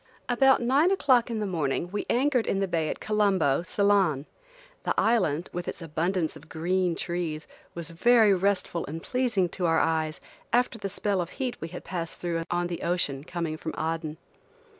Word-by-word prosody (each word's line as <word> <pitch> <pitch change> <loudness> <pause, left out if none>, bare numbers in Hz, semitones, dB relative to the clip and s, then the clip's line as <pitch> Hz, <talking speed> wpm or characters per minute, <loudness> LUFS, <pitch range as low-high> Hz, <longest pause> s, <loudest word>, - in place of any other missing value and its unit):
ABOUT 265 +1 +4
nine 275 +8 +4
o'clock 260 -11 +3
in 230 - -2
the 215 - -1
morning 170 -2 -1
we 205 - -3
anchored 255 -1 +2
in 195 - +1
the 195 - +1
bay 165 -3 0
at - - -4
Colombo, 195 -10 +2
Ceylon. 185 -6 +2 0.6
The - - 0
island, 185 -8 +2
with 175 0 -4
its - - -4
abundance 165 +1 -1
of 160 - -14
green 175 +2 0
trees, 170 -3 -3 0.3
was 170 -2 -5
very 220 +4 +5
restful 190 -2 0
and 160 +3 -6
pleasing 240 -8 +1
to 175 0 -1
our 165 - +3
eyes 160 -1 0 0.3
after 245 -1 +2
the 200 -1 -3
spell 200 -1 0
of 170 - -4
heat 255 -2 -3
we 165 - -3
had 175 +2 -8
passed 170 -3 -5
through 170 -1 -2
on 175 0 0
the 175 -1 -4
ocean 170 -6 -1
coming 165 -2 -3
from 160 - -5
Aden. 160 -1 -2
180 Hz, 180 wpm, -27 LUFS, 165-210 Hz, 0.6 s, very